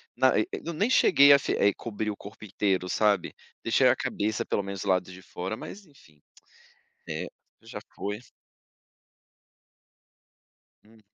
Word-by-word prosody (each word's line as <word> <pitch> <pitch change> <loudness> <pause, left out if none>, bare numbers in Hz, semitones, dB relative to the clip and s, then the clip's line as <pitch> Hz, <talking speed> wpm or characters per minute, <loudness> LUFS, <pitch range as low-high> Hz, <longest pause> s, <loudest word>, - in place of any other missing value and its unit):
na - - +3
e - - +2
eu 170 - -5
nem 205 +10 0
cheguei 145 - +6
a 140 - +8
fe - - -2
eh, 100 0 +3
cobrir 105 -1 -4
o 100 - -8
corpo 100 +1 -12
inteiro, 95 -2 -1
sabe. 105 -4 +1 0.3
Deixei - - +3
a - - +5
cabeça, 110 +1 -2
pelo 100 - -1
menos, 100 -1 -6
do 100 - -3
lado 90 -1 +1
de 95 +1 -12
fora, 95 +3 -5
mas 200 - -10
enfim. 80 - -23 0.9
É, - - -4 0.4
já - - -8 0.2
foi. 105 +2 -4 2.7
Uhum. 110 +1 -21
105 Hz, 150 wpm, -27 LUFS, 95-115 Hz, 2.7 s, a